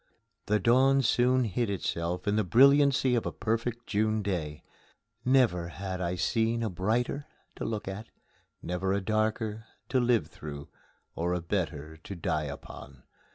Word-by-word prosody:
The 105 +1 +2
dawn 135 +6 +4
soon 125 +2 +3
hid 115 +1 -1
itself 90 -2 -2
in 100 - +2
the 110 - +2
brilliancy 135 - +5
of 120 - +1
a - - -2
perfect 115 +2 -2
June 110 +1 0
day. 80 -7 -3 0.6
Never 120 -10 +3
had 95 +1 -5
I 90 0 -1
seen 115 +3 0
a 110 - -1
brighter 115 - -1 0.3
to - - -4
look 110 -3 -3
at; 100 +3 -6 0.5
never 90 +2 -1
a 100 - +1
darker 110 +1 -1 0.2
to 130 - +2
live 120 -2 +2
through 70 -2 -9 0.4
or 85 +2 -1
a - - -1
better 80 -4 -3
to 90 +5 -8
die 75 -3 -1
upon. 70 -2 -9
105 Hz, 155 wpm, -29 LUFS, 90-120 Hz, 0.6 s, brilliancy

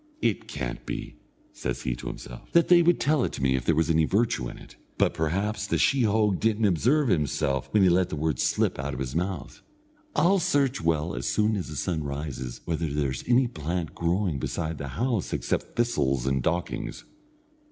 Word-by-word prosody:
"It 115 -5 0
can't 60 -2 -5
be," - - -6 0.4
says 60 -1 -4
he 65 - -1
to - - -8
himself, - - -8
"that 170 -1 +4
they 175 -1 +8
would 175 +1 +3
tell 150 -3 +2
it - - -1
to 70 - -4
me, 65 -1 +3
if 65 -1 -2
there 80 - +3
was 80 +1 +2
any 80 0 +3
virtue 100 - +1
in - - -10
it; - - -14 0.2
but - - +2
perhaps 95 +6 -1
the - - +1
sheehogue 110 -6 +2
didn't 110 0 +2
observe 125 - +3
himself 70 - 0
when 105 -2 +4
he 95 - +6
let 90 +1 +3
the - - -3
word 80 +1 -1
slip - - +1
out - - -3
of - - -6
his 65 0 -4
mouth. 85 -4 -3 0.5
I'll 185 +5 +4
search 140 - +1
well 80 0 0
as - - -3
soon 105 +1 +2
as 95 - -3
the 75 - -7
sun 80 +3 -1
rises, 70 -3 -5
whether 80 0 -1
there's 70 -3 -1
any 125 +2 +4
plant 85 -6 -3
growing 85 -2 0
beside 80 +3 -3
the 70 - -4
house 110 - -1
except - - -2
thistles 70 - +1
and 65 0 +1
dockings." 85 +7 -2
85 Hz, 200 wpm, -27 LUFS, 70-110 Hz, 0.5 s, they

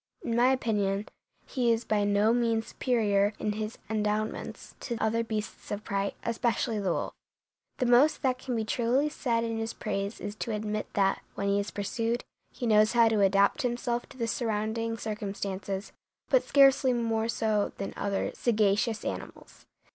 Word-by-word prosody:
In 230 - -1
my 240 +1 +5
opinion 210 -5 0 0.4
he 245 -4 +1
is 230 0 0
by 210 -1 +1
no 205 +2 +3
means 230 -2 +1
superior 210 -5 +1
in 210 - -1
his 215 +1 -4
endowments 215 0 -2
to 235 -3 -4
other 230 +1 +1
beasts 220 -1 -5
of 205 +1 -4
prey, 200 -2 -2
especially 230 -1 0
the 190 -3 0
wolf. - - -2 0.6
The 255 - 0
most 250 +7 +4
that 255 -1 +1
can 255 -1 -3
be 220 -1 -1
truly 245 +6 +1
said 235 -5 -1
in 225 -1 -2
his 225 0 -3
praise 200 0 -3
is 205 0 -5
to 225 - -3
admit 215 0 -3
that, 195 -1 +2
when 200 0 -1
he 200 0 +2
is 200 - -2
pursued, 230 +4 -2 0.3
he 250 - -5
knows 215 -1 +4
how 230 -1 +6
to 215 -2 +2
adapt 200 +7 +4
himself 240 -1 -2
to 270 - -14
the 235 - -1
surrounding 225 0 -1
circumstances, 200 -2 -4 0.4
but - - +5
scarcely 270 -2 +5
more 225 -1 0
so 215 -3 +1
than 195 - -4
other 200 -1 -1
sagacious 220 0 +1
animals. - - -7
220 Hz, 170 wpm, -29 LUFS, 205-235 Hz, 0.6 s, how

